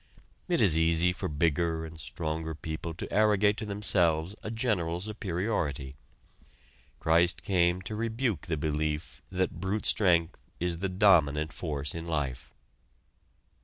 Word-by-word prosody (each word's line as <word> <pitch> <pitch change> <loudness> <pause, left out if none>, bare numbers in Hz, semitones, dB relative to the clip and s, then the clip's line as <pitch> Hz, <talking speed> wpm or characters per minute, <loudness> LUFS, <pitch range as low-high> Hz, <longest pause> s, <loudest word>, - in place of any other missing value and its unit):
It 175 -3 +2
is 85 -7 +5
easy 85 +2 +3
for - - -4
bigger 80 +2 0
and 80 0 -10
stronger 80 0 -4
people 80 +1 -5
to - - -7
arrogate 105 -1 +4
to 110 - -5
themselves 95 -4 +2
a - - -5
general 105 -8 -1
superiority. 90 - -3 1.0
Christ 85 +2 +2
came 90 -1 +2
to 105 - -5
rebuke 115 - -2
the 80 - -1
belief 75 0 -2
that 95 0 -2
brute 100 +3 -2
strength 85 -4 +2 0.2
is 85 -1 -1
the 95 +1 -1
dominant 80 -6 +3
force 75 -4 -3
in 80 0 -6
life. 70 -6 -3
85 Hz, 130 wpm, -29 LUFS, 80-100 Hz, 1.0 s, is